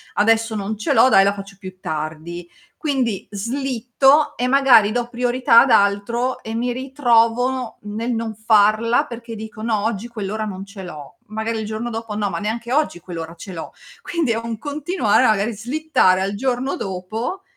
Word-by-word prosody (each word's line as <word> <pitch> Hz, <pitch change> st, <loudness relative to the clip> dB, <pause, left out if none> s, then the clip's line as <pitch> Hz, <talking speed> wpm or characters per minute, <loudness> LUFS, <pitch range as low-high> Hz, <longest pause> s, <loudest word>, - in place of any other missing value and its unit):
adesso 225 Hz, +1 st, +2 dB
non 210 Hz, +1 st, -3 dB
ce 210 Hz, -, 0 dB
l'ho, 230 Hz, +3 st, +6 dB
dai 195 Hz, -, +6 dB
la 200 Hz, +1 st, +2 dB
faccio 195 Hz, 0 st, -10 dB
più 185 Hz, -1 st, -9 dB
tardi". 160 Hz, +2 st, -5 dB, 0.3 s
Quindi 260 Hz, -, -1 dB
slitto 260 Hz, +5 st, +1 dB
e 245 Hz, -, 0 dB
magari 255 Hz, -6 st, +5 dB
do 240 Hz, 0 st, -1 dB
priorità 245 Hz, -1 st, +4 dB
ad 270 Hz, -, +2 dB
altro 220 Hz, +5 st, +2 dB
e 220 Hz, -, -5 dB
mi 245 Hz, +2 st, -1 dB
ritrovo 250 Hz, -1 st, +1 dB
nel 220 Hz, +4 st, -3 dB
non 225 Hz, -1 st, -3 dB
farla, 215 Hz, +1 st, +3 dB
perché 235 Hz, -1 st, -8 dB
dico: 220 Hz, 0 st, -8 dB
"no 220 Hz, -2 st, 0 dB
oggi 225 Hz, 0 st, -2 dB
quell'ora 215 Hz, -2 st, -4 dB
non 195 Hz, -1 st, -6 dB
ce 200 Hz, -1 st, -10 dB
l'ho". 155 Hz, +2 st, -10 dB
Magari 220 Hz, +1 st, -3 dB
il 220 Hz, -, -4 dB
giorno 220 Hz, +2 st, -4 dB
dopo: 225 Hz, -1 st, -5 dB
"no, 205 Hz, -1 st, -1 dB
ma -, -, -3 dB
neanche 230 Hz, +3 st, -3 dB
oggi 295 Hz, -, +1 dB
quell'ora 165 Hz, -1 st, -7 dB
ce 190 Hz, -, -9 dB
l'ho". 165 Hz, -, -7 dB, 0.3 s
Quindi 330 Hz, -8 st, -1 dB
è 225 Hz, -, 0 dB
un 230 Hz, 0 st, -4 dB
continuare 290 Hz, -, +1 dB
magari 215 Hz, +1 st, +1 dB
slittare 230 Hz, -5 st, +1 dB
al 195 Hz, +1 st, -1 dB
giorno 255 Hz, +3 st, -1 dB
dopo 215 Hz, -, -4 dB
225 Hz, 175 wpm, -20 LUFS, 200-245 Hz, 0.3 s, l'ho